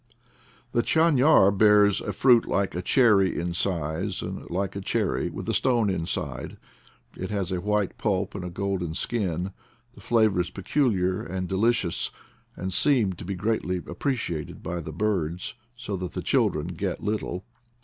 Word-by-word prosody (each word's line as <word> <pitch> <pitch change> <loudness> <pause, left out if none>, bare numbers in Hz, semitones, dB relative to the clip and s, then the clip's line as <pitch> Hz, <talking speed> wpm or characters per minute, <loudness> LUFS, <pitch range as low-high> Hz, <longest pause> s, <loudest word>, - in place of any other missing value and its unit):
The 120 - +2
chafiar 150 - +5
bears 105 0 +5
a - - -3
fruit 125 -3 +4
like 100 -1 0
a 90 - -3
cherry 105 -3 +4
in 85 +1 -2
size, 85 +1 -2
and, - - -6
like 95 +3 -2
a 100 - -4
cherry, - - 0
with - - -7
a - - 0
stone 120 -6 +2
inside; 85 -3 -3 0.6
it 95 - -5
has 100 -3 -2
a 90 -1 -1
white 105 0 -1
pulp 100 -3 0
and 100 - -5
a 90 - -4
golden 90 -3 -2
skin; 95 -5 -1 0.4
the - - -15
flavor 110 -5 +3
is 85 - -4
peculiar 95 -4 0
and 95 0 -4
delicious, 100 -2 +1 0.5
and 95 0 -4
seemed 110 - +2
to - - -7
be 100 +1 -3
greatly 100 -2 -1
appreciated 90 - -3
by 90 - -3
the 80 -1 -6
birds, 90 -2 -1 0.2
so 110 -4 -5
that 90 -1 -5
the - - -4
children 75 +3 +1
get 90 +2 -4
little. 105 -4 -2
95 Hz, 160 wpm, -26 LUFS, 90-110 Hz, 0.6 s, chafiar